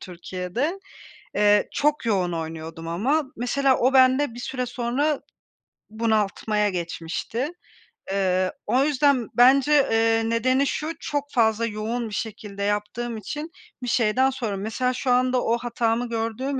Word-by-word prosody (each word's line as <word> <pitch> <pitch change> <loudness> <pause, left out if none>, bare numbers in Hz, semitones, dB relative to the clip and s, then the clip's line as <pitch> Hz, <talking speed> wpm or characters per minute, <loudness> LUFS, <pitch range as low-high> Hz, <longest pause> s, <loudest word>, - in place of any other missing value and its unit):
Türkiye'de. 185 - -4 0.5
Eee, 205 0 +4
çok 295 -3 +1
yoğun 185 -5 +1
oynuyordum 165 0 -6
ama 260 - +1
mesela 260 +2 +2
o 255 +2 +3
bende 260 0 +4
bir 240 - -8
süre 250 0 -3
sonra 255 +5 -1 0.7
bunaltmaya 215 -1 0
geçmişti. 175 - -3 0.6
Eee, 185 -1 +1
o 250 +5 +2
yüzden 280 -4 +2
bence, 265 +4 +5 0.2
eee, 225 0 +2
nedeni 255 +4 +2
şu, 305 +3 -2
çok 290 0 -3
fazla 225 -1 +2
yoğun 225 +2 -3
bir - - -10
şekilde 205 -2 -5
yaptığım 210 +3 -2
için 295 - -6 0.3
bir 245 - -3
şeyden 245 +2 +2
sonra 230 -7 -3
Mesela 225 +5 -1
şu 255 0 -1
anda 250 0 +2
o 235 - +1
hatamı 235 0 -1
gördüğüm 230 +4 -2
230 Hz, 135 wpm, -24 LUFS, 210-260 Hz, 0.7 s, bence